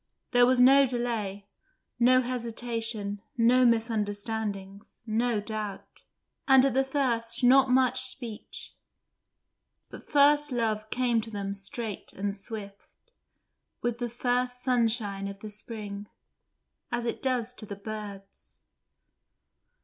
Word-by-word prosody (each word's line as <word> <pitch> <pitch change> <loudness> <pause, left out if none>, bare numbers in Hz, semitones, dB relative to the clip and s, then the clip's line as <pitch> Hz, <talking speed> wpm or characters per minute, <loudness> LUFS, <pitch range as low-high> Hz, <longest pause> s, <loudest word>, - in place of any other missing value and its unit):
There 245 0 +5
was 255 0 +3
no 270 +2 +7
delay, 225 -5 -3 0.5
no 255 +2 +5
hesitation, 230 -4 -2 0.2
no 245 +2 +5
misunderstandings, 210 -3 -2
no 230 0 0
doubt: 210 -1 -5 0.6
and 265 -1 +7
at 275 - +1
the 265 +1 +3
first 255 -4 0
not 265 +1 +6
much 255 0 +3
speech; 245 -4 -3 1.2
but - - -12
first 290 0 +4
love 220 -3 -1
came 245 -2 +1
to 225 - -8
them 200 -2 -4
straight 200 +1 -6
and 200 +1 -3
swift, 205 - -10 0.7
with 240 -1 -1
the 240 -1 -2
first 250 +1 -1
sunshine 225 -5 0
of 200 0 -8
the 215 - -7
spring, 205 -1 -6 0.8
as 240 0 -2
it 230 - -3
does 250 -2 0
to 220 -3 -4
the 200 - -6
birds. 200 -1 -9
230 Hz, 120 wpm, -28 LUFS, 210-250 Hz, 1.2 s, no